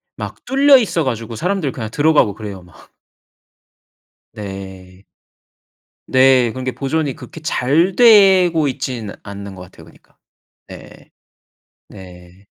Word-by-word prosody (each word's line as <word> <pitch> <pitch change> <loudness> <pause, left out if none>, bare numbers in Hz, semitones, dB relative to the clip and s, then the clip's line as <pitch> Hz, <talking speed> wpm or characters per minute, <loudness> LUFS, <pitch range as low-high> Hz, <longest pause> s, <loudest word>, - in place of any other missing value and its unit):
막 - - -8
뚫려 275 +1 +5
있어 205 -9 -1
가지고 115 -4 -4
사람들 180 - -2
그냥 110 -4 -6
들어가고 145 -6 +2
그래요 100 -4 -8
막. 90 -1 -20 1.4
네. 95 -2 -10 1.0
네. 130 -2 +4
그런 130 +3 -7
게 130 - -2
보존이 140 +1 -2
그렇게 160 - -12
잘 160 +5 0
되고 190 - +5
있지는 125 -5 -5
않는 100 -1 -9
것 90 - -11
같아요 90 - -16
그니까. - - -23 0.5
네. - - -14 0.8
네. 90 0 -15
130 Hz, 235 characters per minute, -17 LUFS, 100-160 Hz, 1.4 s, 뚫려